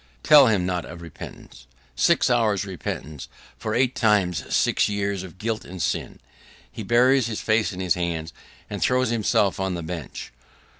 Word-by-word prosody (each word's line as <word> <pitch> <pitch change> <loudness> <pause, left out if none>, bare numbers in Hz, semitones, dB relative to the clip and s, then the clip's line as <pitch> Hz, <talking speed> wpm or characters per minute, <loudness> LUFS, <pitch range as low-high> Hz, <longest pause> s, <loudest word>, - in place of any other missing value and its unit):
Tell 145 -3 +8
him 100 -5 +1
not 90 -2 -2
of 85 -1 -10
repentance! 70 -5 -11 0.3
Six 60 - +3
hours' 110 -5 +2
repentance 80 -6 -6 0.3
for 110 +7 -3
eight 130 -1 +2
times 105 -6 +1
six - - +2
years 100 -2 -2
of 95 -1 -11
guilt 110 +2 -3
and 95 +1 -10
sin! - - -2 0.5
He - - -8
buries 120 +3 +3
his 110 -2 -4
face 110 0 +1
in 90 - -8
his 90 -3 +2
hands, 85 -2 -3 0.3
and - - -6
throws 125 -2 +2
himself 105 -4 +1
on 95 -1 -1
the 85 - -5
bench. 80 -8 -7
100 Hz, 165 wpm, -24 LUFS, 90-115 Hz, 0.5 s, Tell